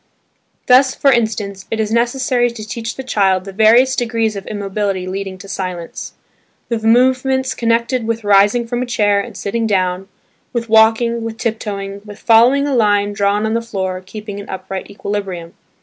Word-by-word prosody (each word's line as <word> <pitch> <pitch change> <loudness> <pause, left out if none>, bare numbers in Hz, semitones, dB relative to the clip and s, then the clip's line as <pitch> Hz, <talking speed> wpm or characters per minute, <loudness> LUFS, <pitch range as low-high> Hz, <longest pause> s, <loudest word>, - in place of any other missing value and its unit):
Thus, 260 +1 +5
for 275 - +3
instance, 210 -5 -1
it 225 - -3
is 215 -1 -1
necessary 245 +1 +1
to 220 -2 -9
teach 225 +2 -5
the 265 - -6
child 195 -6 +1
the 195 - -7
various 230 +6 +5
degrees 225 -3 -1
of 200 0 -7
immobility 200 -2 -2
leading 190 0 -5
to 195 - -12
silence; 180 -3 -6 0.6
the 230 -2 -1
movements 260 +3 +2
connected 235 +1 0
with 230 -1 -2
rising 205 +4 +4
from 240 +1 -3
a 250 - -3
chair 205 -4 +2
and - - -9
sitting 225 +3 -2
down, 185 -2 0 0.5
with 235 -2 -3
walking, 225 +1 +4
with 225 -1 -5
tiptoeing, 200 -4 -4
with 205 -1 -11
following 245 +5 +4
a 285 - -1
line 205 -3 +2
drawn 205 +1 +1
on 220 - -1
the 230 - 0
floor 190 -5 -4
keeping 205 +1 -8
an 200 - -10
upright 190 0 -6
equilibrium. 200 -4 -5
220 Hz, 170 wpm, -17 LUFS, 200-235 Hz, 0.6 s, Thus